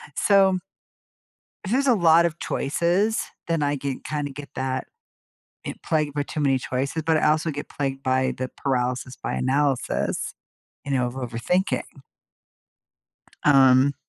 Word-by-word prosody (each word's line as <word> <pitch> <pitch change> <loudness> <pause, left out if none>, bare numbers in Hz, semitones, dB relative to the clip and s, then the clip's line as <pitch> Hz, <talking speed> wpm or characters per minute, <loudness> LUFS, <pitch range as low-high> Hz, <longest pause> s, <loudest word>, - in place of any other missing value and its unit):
so 195 -2 +4 1.1
if 185 - -4
there's 275 +3 +2
a 255 - +5
lot 170 -3 +5
of 170 0 -4
choices, 175 +9 0 0.3
then 165 -3 0
I 145 0 +1
get 135 -1 -4
kinda 145 -2 -3
get 140 +1 -9
that 130 0 -2 0.8
i - - -3
plagued 150 -3 0
by 145 - 0
too 150 - -7
many 135 -2 +3
choices, 135 +5 -2
but 160 -1 +3
I 155 - +2
also 155 +1 +2
get 145 0 -6
plagued 135 -1 -3
by 130 0 +1
the 130 0 -2
paralysis 125 -1 -1
by - - -3
analysis, 135 0 0 0.5
you 140 - -3
know, 125 -2 +2
of 120 - -5
overthinking 130 - -1 1.6
um 135 -1 +6
145 Hz, 145 wpm, -24 LUFS, 130-165 Hz, 1.6 s, um